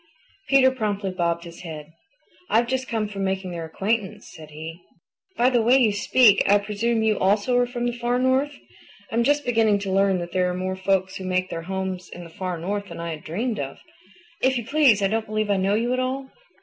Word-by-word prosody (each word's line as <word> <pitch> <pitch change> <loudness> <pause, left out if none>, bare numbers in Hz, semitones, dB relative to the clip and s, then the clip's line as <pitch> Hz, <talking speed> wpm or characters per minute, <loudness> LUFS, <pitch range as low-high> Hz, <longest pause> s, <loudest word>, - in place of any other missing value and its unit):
Peter 270 -1 +6
promptly 205 -6 -2
bobbed 170 -2 -1
his 170 -1 -11
head. 155 -2 -9 0.6
"I've 230 +2 +3
just 260 +2 -2
come 220 -2 -1
from 200 -1 -5
making 190 -1 -2
their 170 -1 -5
acquaintance," 195 +4 -3
said 155 -1 -11
he. 160 +3 -9 0.6
"By 250 +2 +4
the 240 -2 +3
way 240 +4 +5
you 230 -6 +3
speak, 210 +1 +5
I 205 - +7
presume 220 +3 -1
you 215 -2 +1
also 205 +6 +2
are 245 - +2
from 240 0 -3
the 240 - +1
Far 240 +1 -1
North. 260 +3 +1 0.6
I - - -3
am 235 - +3
just 290 +2 +2
beginning 225 -4 +3
to 200 -1 -4
learn 195 0 +3
that 175 -1 -5
there 180 0 +1
are 180 - -3
more 185 +1 -2
folks 190 0 0
who 190 - -7
make 185 0 -1
their 165 - -4
homes 190 -2 -4
in 175 - -9
the 170 - -12
Far 180 +1 -4
North 200 +4 -3
than - - -9
I 170 0 -4
had 155 -1 -7
dreamed 215 +8 -3
of. - - -5 0.6
If 260 0 +2
you 235 - -4
please, 265 -8 +4
I - - +4
don't 220 +2 -1
believe 215 -1 -1
I 200 - +2
know 195 +2 +1
you 235 +3 0
at 255 - 0
all." 265 +1 -3
205 Hz, 225 wpm, -24 LUFS, 185-240 Hz, 0.6 s, I